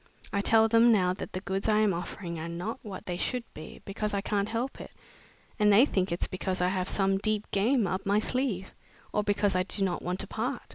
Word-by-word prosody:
I 200 - +2
tell 225 +2 +5
them 230 +1 +5
now 185 -4 +3
that - - -7
the 185 - -3
goods 195 +2 -2
I 210 - +4
am 215 -2 +3
offering 170 0 -5
are 165 +1 -5
not 175 +7 -4
what 200 -3 -8
they 175 -1 -3
should 250 +5 -1
be, 155 - -10
because 205 +1 -3
I 200 - 0
can't 200 +1 -1
help 235 +4 -3
it, - - -9 0.7
and 210 0 +5
they 220 +6 +7
think 190 -9 0
it's 170 - 0
because 185 0 -3
I 180 0 +2
have 185 -1 -1
some 195 -1 +1
deep 215 0 -1
game 225 +4 +2
up 185 +1 -2
my 200 +1 +2
sleeve, 220 -4 -1 0.4
or 210 - +1
because 205 -1 +1
I 185 - +3
do 195 +2 0
not 180 -2 -2
want 180 +1 -3
to - - -5
part. 245 +3 -3
200 Hz, 235 wpm, -29 LUFS, 185-215 Hz, 0.7 s, they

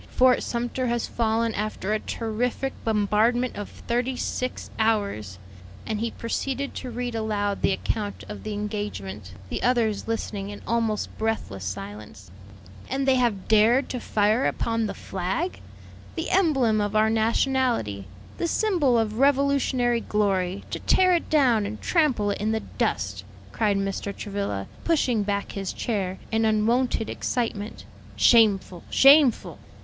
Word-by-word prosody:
Fort 255 0 +5
Sumter 245 +2 -2
has 235 -1 0
fallen 225 0 0
after 210 -1 -2
a 215 - +1
terrific 240 +5 -2
bombardment 225 +3 +1
of 205 - -6
thirty 245 +2 -2
six 255 0 -3
hours." 200 - 0 0.5
And 215 - -2
he 230 +1 -1
proceeded 270 +4 -3
to 255 - -6
read 245 0 -4
aloud 210 -2 -1
the - - +3
account 205 +1 -3
of 210 - -7
the 215 - -5
engagement, 205 - -5 0.2
the - - -3
others 230 -5 +1
listening 205 -3 -3
in 205 - -9
almost 225 -2 -1
breathless 220 - -2
silence. 100 0 -7 0.6
"And 270 0 -1
they 265 -1 +5
have 230 -6 0
dared 225 +5 +4
to 250 - -3
fire 215 +3 +2
upon 230 -1 -1
the - - -5
flag! 195 - -3 0.6
the 330 - -3
emblem 270 - +3
of 205 +1 -2
our 215 +1 +4
nationality, 225 - +1 0.3
the 340 - 0
symbol 335 - +2
of 220 0 -1
Revolutionary 275 -3 +2
glory; 195 -3 0
to - - -3
tear 370 -1 +4
it 340 - 0
down 245 -9 +3
and 215 +1 -6
trample 260 - +2
it - - -4
in 215 +1 +1
the 220 - -1 0.2
dust!" 100 - -1 0.3
cried 210 -3 +1
Mr. 195 0 -3
Travilla, 200 - -3 0.2
pushing 265 -9 +2
back 200 0 -2
his 195 -2 -4
chair 190 -5 -2
in 225 0 +2
unwonted 225 +2 +1
excitement; 225 -4 -3 0.3
"shameful, 200 -6 +4
shameful!" 275 -2 +5
220 Hz, 145 wpm, -25 LUFS, 205-250 Hz, 0.6 s, Fort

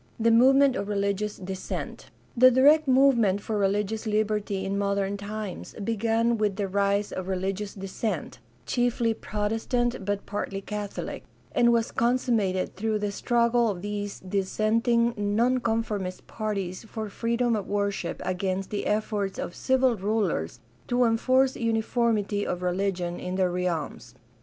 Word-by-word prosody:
The 230 +1 +4
movement 270 +3 +5
of 200 - -3
religious 200 0 -1
dissent. 190 0 -6
— - - -33
The 255 - +11
direct 290 +5 +5
move 270 +1 +5
ment 205 -4 +2
for 215 +2 -4
religious 205 +3 0
liberty 210 -2 0
in 195 +1 -2
modern 200 0 0
times 205 -1 -6
began 230 +2 0
with 210 -2 +1
the 200 -1 -2
rise 200 +1 +1
of 185 -1 -5
religious 195 +2 -3
dissent 195 - -4 0.3
(chiefly 240 - +1
Protestant 225 +3 -1
but 205 +1 -2
partly 200 -1 -3
Catholic), 205 0 -5 0.3
and 235 0 +4
was 230 -1 +1
consummated 230 -6 +1
through 215 +2 0
the 205 -1 -2
struggle 235 +2 +2
of 185 -3 -4
these 205 -1 -4
dissenting 220 +5 +1
nonconformist 220 -3 0
parties 200 -4 -4
for 220 -1 -5
freedom 235 +3 0
of 205 -3 -3
worship 200 -1 -2
against 185 +1 -2
the 205 - -2
efforts 210 -2 -1
of - - -4
civil 260 +1 +2
rulers 190 - -1 0.3
to 245 +1 +2
enforce 255 +3 +3
uniformity 225 -2 0
of 180 -2 -3
religion 180 -1 -1
in 180 0 -4
their 185 -1 +1
realms. 165 -8 -3
210 Hz, 140 wpm, -26 LUFS, 195-230 Hz, 0.3 s, The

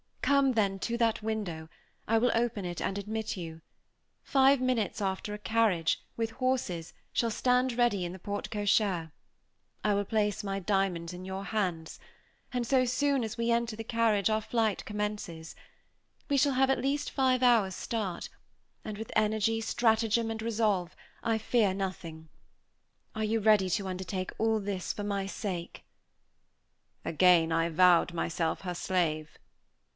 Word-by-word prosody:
Come, 280 -2 +4
then, 200 -4 +1
to 235 +4 -2
that 230 -2 +1
window; 200 -8 -4 0.4
I 225 - +3
will 245 +2 +3
open 230 -4 0
it 175 -1 -4
and 195 - -2
admit 215 +1 -3
you. 165 -2 -7 0.6
Five 270 0 +4
minutes 245 -7 0
after 195 +1 -2
a - - -4
carriage 210 - -9 0.5
carriage, - - -24 0.2
with 225 -1 0
four - - -19
horses, 245 -11 -1 0.2
shall 230 - +1
stand 250 +2 +2
ready 235 -6 +2
in 175 - -5
the - - -8
porte 205 +2 -5
cochère. 205 -5 +1 0.7
I 210 - +2
will 200 0 0
place 210 -1 0
my 195 -1 -2
diamonds 185 -3 -1
in 180 +1 -8
your 190 +1 -5
hands; 180 -5 -2 0.5
and 250 -2 -1
so 255 +1 +3
soon 275 +1 +1
as 225 +1 -5
we 235 0 +1
enter 235 -1 0
the 225 - -6
carriage 225 -3 +2
our 215 0 +1
flight 220 -2 0
commences. 210 -6 -4 0.8
We 285 - +2
shall 280 +1 +3
have 265 +1 +3
at 270 - +1
least 280 +3 -1
five 260 -2 +2
hours' 225 -6 +4
start; 205 -7 -3 0.5
and 215 -1 -6
with 220 +1 -7
energy, 220 +1 +2
stratagem, 225 0 +1
and 220 0 -4
resource, 210 -6 0 0.3
I 225 -1 +1
fear 215 -3 +1
nothing. 165 -5 -5 0.8
Are 220 - -3
you 225 +1 +1
ready 205 -3 +4
to 200 0 0
undertake 185 0 -4
all 225 0 +2
this 195 -3 -3
for 205 - -5
my 200 -1 -2
sake?" 185 -4 -5 1.2
Again 170 -1 +4
I 165 +1 +2
vowed 175 +1 +4
myself 165 -1 -1
her 180 -2 -4
slave. 165 -4 -1
210 Hz, 160 wpm, -30 LUFS, 185-230 Hz, 1.2 s, Come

